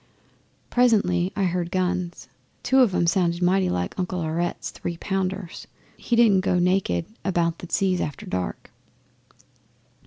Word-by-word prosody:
'Presently 200 Hz, -7 st, +3 dB
I 200 Hz, -, 0 dB
heard 175 Hz, -1 st, -1 dB
guns. 180 Hz, -1 st, -2 dB, 0.4 s
Two 265 Hz, +2 st, +3 dB
of 230 Hz, -8 st, +4 dB
'em -, -, +2 dB
sounded 175 Hz, 0 st, +1 dB
mighty 185 Hz, +1 st, +3 dB
like 90 Hz, -, -3 dB
Uncle 180 Hz, 0 st, -2 dB
Aurette's 170 Hz, +2 st, -2 dB
three 170 Hz, -, -5 dB
pounders. 190 Hz, -1 st, -3 dB, 0.3 s
He 240 Hz, -, -1 dB
didn't 220 Hz, -5 st, +5 dB
go 180 Hz, -, +1 dB
naked 180 Hz, -, +1 dB, 0.2 s
about 170 Hz, -3 st, 0 dB
the 180 Hz, -, -8 dB
seas 185 Hz, -2 st, +1 dB
after 145 Hz, -, -5 dB
dark. 90 Hz, -1 st, -4 dB
180 Hz, 135 wpm, -24 LUFS, 170-195 Hz, 0.4 s, didn't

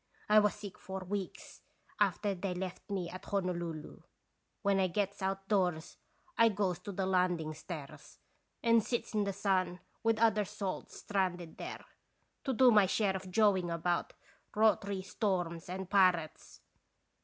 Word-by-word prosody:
I 215 Hz, 0 st, +7 dB
was 210 Hz, -1 st, +2 dB
sick 205 Hz, -2 st, -9 dB
for 190 Hz, 0 st, -6 dB
weeks 190 Hz, 0 st, -5 dB, 0.4 s
after 205 Hz, -2 st, +2 dB
they 185 Hz, 0 st, -3 dB
left 185 Hz, +3 st, -6 dB
me 190 Hz, -3 st, -2 dB
at 185 Hz, +2 st, -8 dB
Hono 185 Hz, -2 st, 0 dB
lulu. 165 Hz, -3 st, -6 dB, 0.6 s
When 200 Hz, -1 st, +3 dB
I 190 Hz, -, +3 dB
gets 200 Hz, +2 st, -2 dB
outdoors 190 Hz, -4 st, 0 dB, 0.4 s
I 230 Hz, 0 st, +7 dB
goes 195 Hz, -4 st, -1 dB
to 205 Hz, -, -7 dB
the 190 Hz, 0 st, -1 dB
land 180 Hz, -2 st, +2 dB
ing 155 Hz, -1 st, -4 dB
stairs 155 Hz, -2 st, -9 dB, 0.5 s
and 230 Hz, -2 st, +5 dB
sits 240 Hz, 0 st, -2 dB
in 210 Hz, -1 st, +1 dB
the 200 Hz, -, 0 dB
sun 185 Hz, -2 st, 0 dB, 0.2 s
with 225 Hz, -1 st, +2 dB
other 220 Hz, -2 st, +4 dB
salts 200 Hz, -2 st, -5 dB
stranded 180 Hz, -4 st, -2 dB
there, -, -, -7 dB, 0.6 s
to 270 Hz, -, +1 dB
do 255 Hz, 0 st, +6 dB
my 210 Hz, -3 st, +6 dB
share 195 Hz, 0 st, +1 dB
of 190 Hz, 0 st, -6 dB
jawing 190 Hz, -3 st, +3 dB
about 170 Hz, +1 st, -1 dB, 0.4 s
rot'ry 200 Hz, -2 st, +2 dB
storms 175 Hz, -5 st, -2 dB
and 190 Hz, +1 st, -4 dB
pirates. 185 Hz, -5 st, +2 dB
190 Hz, 155 wpm, -33 LUFS, 180-205 Hz, 0.6 s, I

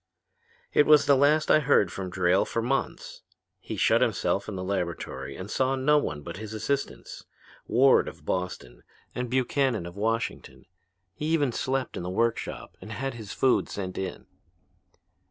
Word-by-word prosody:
"It 145 Hz, -, +4 dB
was 150 Hz, -1 st, +7 dB
the 140 Hz, -, +5 dB
last 150 Hz, +3 st, +3 dB
I -, -, +7 dB
heard 125 Hz, -, +3 dB
from 95 Hz, -1 st, -5 dB
Drayle 90 Hz, +1 st, +2 dB
for -, -, -3 dB
months. 135 Hz, +3 st, -3 dB, 0.4 s
He -, -, -6 dB
shut -, -, +3 dB
himself -, -, 0 dB
in 100 Hz, -, -5 dB
his 90 Hz, -, -4 dB
laboratory 90 Hz, -4 st, -3 dB
and 95 Hz, -, -6 dB
saw 130 Hz, +5 st, +1 dB
no 150 Hz, +3 st, +3 dB
one 75 Hz, -, -4 dB
but 85 Hz, +3 st, -7 dB
his 110 Hz, +1 st, -7 dB
assistants, 140 Hz, +6 st, -3 dB, 0.4 s
Ward 130 Hz, +4 st, +5 dB
of -, -, -10 dB
Boston, 90 Hz, -10 st, -4 dB, 0.3 s
and 125 Hz, -1 st, -3 dB
Buchannon 130 Hz, -4 st, +1 dB
of 85 Hz, +1 st, -9 dB
Washington. 115 Hz, +3 st, -3 dB, 0.5 s
He 150 Hz, -, -4 dB
even 155 Hz, -5 st, +2 dB
slept 130 Hz, +2 st, -2 dB
in -, -, -4 dB
the 90 Hz, -, -4 dB
workshop 115 Hz, +5 st, -2 dB
and 110 Hz, -, -9 dB
had 135 Hz, +5 st, -3 dB
his 110 Hz, -4 st, -8 dB
food 130 Hz, -, +2 dB
sent 95 Hz, -2 st, -5 dB
in. 95 Hz, -1 st, -5 dB
115 Hz, 165 wpm, -27 LUFS, 95-135 Hz, 0.5 s, was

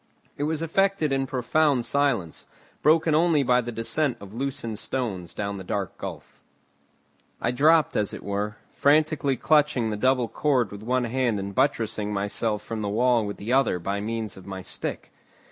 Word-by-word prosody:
It 145 Hz, -, -2 dB
was 160 Hz, +1 st, -1 dB
effected 195 Hz, -2 st, +1 dB
in 135 Hz, 0 st, 0 dB
profound 130 Hz, +1 st, +1 dB
silence, 135 Hz, -, 0 dB, 0.3 s
broken 160 Hz, +1 st, +4 dB
only 160 Hz, -2 st, +3 dB
by 125 Hz, -1 st, +3 dB
the 120 Hz, 0 st, -5 dB
descent 125 Hz, +5 st, -1 dB
of 100 Hz, 0 st, -11 dB
loosened 115 Hz, -4 st, -3 dB
stones 100 Hz, -10 st, -3 dB
down 100 Hz, -1 st, -4 dB
the 95 Hz, -, -7 dB
dark 95 Hz, +1 st, -3 dB
gulf. -, -, -8 dB, 1.0 s
I -, -, 0 dB
dropped 155 Hz, +4 st, +4 dB
as 105 Hz, -, 0 dB
it -, -, -8 dB
were, 100 Hz, +1 st, -2 dB, 0.2 s
frantically 145 Hz, -2 st, +2 dB
clutching 150 Hz, -7 st, +2 dB
the -, -, -1 dB
double 130 Hz, +1 st, +2 dB
cord 130 Hz, -7 st, +1 dB
with 100 Hz, 0 st, -8 dB
one 125 Hz, +3 st, 0 dB
hand 120 Hz, -3 st, 0 dB
and 100 Hz, 0 st, -5 dB
buttressing 115 Hz, -4 st, 0 dB
myself 105 Hz, +1 st, -1 dB
from 115 Hz, -1 st, -4 dB
the 105 Hz, -, -2 dB
wall 120 Hz, 0 st, +2 dB
with 100 Hz, -, -5 dB
the 110 Hz, +5 st, -3 dB
other 130 Hz, -8 st, +3 dB
by 100 Hz, +4 st, -3 dB
means 110 Hz, -1 st, -3 dB
of 95 Hz, -, -13 dB
my 95 Hz, -1 st, -6 dB
stick. -, -, -5 dB
120 Hz, 175 wpm, -25 LUFS, 105-140 Hz, 1.0 s, broken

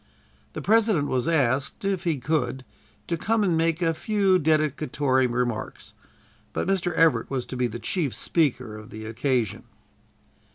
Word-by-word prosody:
The -, -, -6 dB
President 210 Hz, -9 st, +3 dB
was 130 Hz, +3 st, 0 dB
asked, 140 Hz, 0 st, 0 dB
if 195 Hz, -2 st, -1 dB
he 165 Hz, -4 st, +1 dB
could, 130 Hz, -2 st, -1 dB, 0.4 s
to 170 Hz, -, -2 dB
come 220 Hz, +5 st, +1 dB
and 180 Hz, -4 st, +2 dB
make 165 Hz, +1 st, +1 dB
a 165 Hz, -1 st, +2 dB
few 195 Hz, +1 st, +2 dB
dedicatory 150 Hz, -4 st, +1 dB
remarks, 120 Hz, -2 st, -3 dB, 0.6 s
but -, -, -2 dB
Mr. 190 Hz, -2 st, +1 dB
Everett 165 Hz, -1 st, +3 dB
was 130 Hz, -3 st, -2 dB
to -, -, -7 dB
be 125 Hz, -1 st, +1 dB
the 120 Hz, 0 st, -6 dB
chief 150 Hz, +1 st, -2 dB
speaker 130 Hz, -9 st, 0 dB
of 110 Hz, 0 st, -11 dB
the 110 Hz, 0 st, -8 dB
occasion. 120 Hz, -1 st, -1 dB
150 Hz, 155 wpm, -25 LUFS, 125-170 Hz, 0.6 s, President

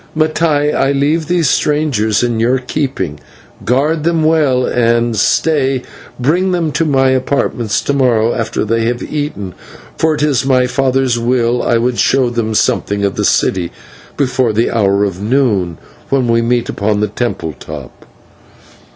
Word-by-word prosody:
Mattai, 155 Hz, -2 st, +1 dB
I 135 Hz, -, +1 dB
leave 150 Hz, +3 st, 0 dB
these 175 Hz, -3 st, +1 dB
strangers 130 Hz, -8 st, +1 dB
in 120 Hz, -2 st, 0 dB
your 120 Hz, +3 st, +2 dB
keeping. 125 Hz, -, -3 dB, 0.4 s
Guard 150 Hz, +5 st, +1 dB
them 165 Hz, -1 st, +1 dB
well 150 Hz, -5 st, +2 dB
and, 120 Hz, -1 st, +1 dB
stay, 135 Hz, +3 st, +1 dB, 0.4 s
bring 175 Hz, +9 st, +1 dB
them 165 Hz, -3 st, 0 dB
to 165 Hz, +4 st, 0 dB
my 135 Hz, -3 st, +2 dB
apartments 130 Hz, -4 st, 0 dB
to 140 Hz, -, -1 dB
morrow 120 Hz, -4 st, +2 dB
after 115 Hz, -2 st, -2 dB
they 115 Hz, +1 st, 0 dB
have 120 Hz, +1 st, -2 dB
eaten, 125 Hz, -12 st, -4 dB, 0.5 s
for 160 Hz, -1 st, +2 dB
if 150 Hz, -, -2 dB
it -, -, +3 dB
is 135 Hz, -4 st, +1 dB
my 130 Hz, -1 st, +2 dB
father's 130 Hz, -1 st, 0 dB
will, 120 Hz, 0 st, +1 dB
I 120 Hz, -, +1 dB
would 120 Hz, +1 st, -1 dB
show 130 Hz, -3 st, +2 dB
them 110 Hz, -2 st, -2 dB
something 100 Hz, -1 st, 0 dB
of 100 Hz, -, -1 dB
the -, -, -1 dB
city 90 Hz, -2 st, +1 dB, 0.5 s
before 130 Hz, -4 st, +1 dB
the 115 Hz, +3 st, +1 dB
hour 100 Hz, -3 st, +2 dB
of 95 Hz, -2 st, -3 dB
noon, 105 Hz, -, 0 dB, 0.3 s
when 135 Hz, -3 st, +1 dB
we 115 Hz, 0 st, +2 dB
meet 120 Hz, 0 st, 0 dB
upon 105 Hz, 0 st, -1 dB
the 105 Hz, -, +1 dB
temple 105 Hz, -7 st, -3 dB
top." 70 Hz, -5 st, -10 dB
125 Hz, 160 wpm, -14 LUFS, 115-145 Hz, 0.5 s, it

